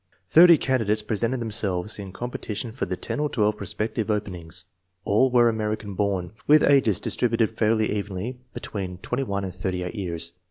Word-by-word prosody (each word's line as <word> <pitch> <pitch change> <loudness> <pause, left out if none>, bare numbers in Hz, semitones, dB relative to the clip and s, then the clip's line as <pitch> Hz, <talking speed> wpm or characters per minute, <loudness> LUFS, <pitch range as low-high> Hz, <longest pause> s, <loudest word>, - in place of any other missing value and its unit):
Thirty 170 - +8
candidates 110 -6 +1
presented 115 +4 -1
themselves 105 -3 -2
in 100 -2 -7
competi 115 +1 -5
tion 115 +2 -3
for 125 - -3
the 90 0 -3
ten - - -4
or 150 0 +1
twelve 105 -5 +1
prospective 110 +2 -3
openings. 90 -4 -3 0.4
All 110 +6 +4
were 120 -1 +5
American 110 -2 -2
born, 95 -2 -1 0.2
with 150 0 +6
ages 130 -9 +4
distributed 115 -2 +1
fairly 110 0 +2
evenly 105 +4 -4
between 95 -3 -5
21 100 -1 -2
and 95 -2 -4
38 90 -1 -3
years. 85 -5 -4
105 Hz, 160 wpm, -25 LUFS, 95-120 Hz, 0.4 s, Thirty